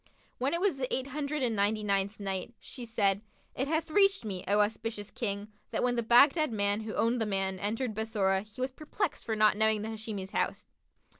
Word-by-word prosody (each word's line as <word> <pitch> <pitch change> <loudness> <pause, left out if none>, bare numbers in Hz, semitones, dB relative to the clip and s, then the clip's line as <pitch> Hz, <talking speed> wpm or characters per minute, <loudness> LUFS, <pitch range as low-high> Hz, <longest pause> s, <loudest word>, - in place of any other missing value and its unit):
When 270 +6 +1
it - - -1
was 375 -6 +1
the 255 -1 -3
Eight 260 - +1
Hundred 285 +1 -3
and 235 -3 +1
Ninety 210 +1 +1
ninth 200 0 0
Night, 195 +3 -3
She 245 - -8
said, 200 -3 +1 0.3
It 265 - -2
hath 315 +1 -1
reached 390 - +4
me, 190 -4 -4
O 205 +2 +4
auspicious 210 0 -2
King, 205 -2 -3 0.2
that - - -1
when 245 0 +2
the 235 - +1
Baghdad 275 +6 +5
man 205 0 +1
who 220 0 -5
owned 230 +1 +1
the 220 - 0
maid 195 -2 -1
entered 220 +4 -1
Bassorah, 205 -3 0
he 210 +3 -15
was 260 +1 -1
perplexed 310 +6 -3
for 220 - -1
not 215 -1 +4
knowing 220 -1 +2
the 220 - -4
Hashimi's 215 -3 -5
house. - - -1
220 Hz, 210 wpm, -30 LUFS, 205-255 Hz, 0.3 s, Baghdad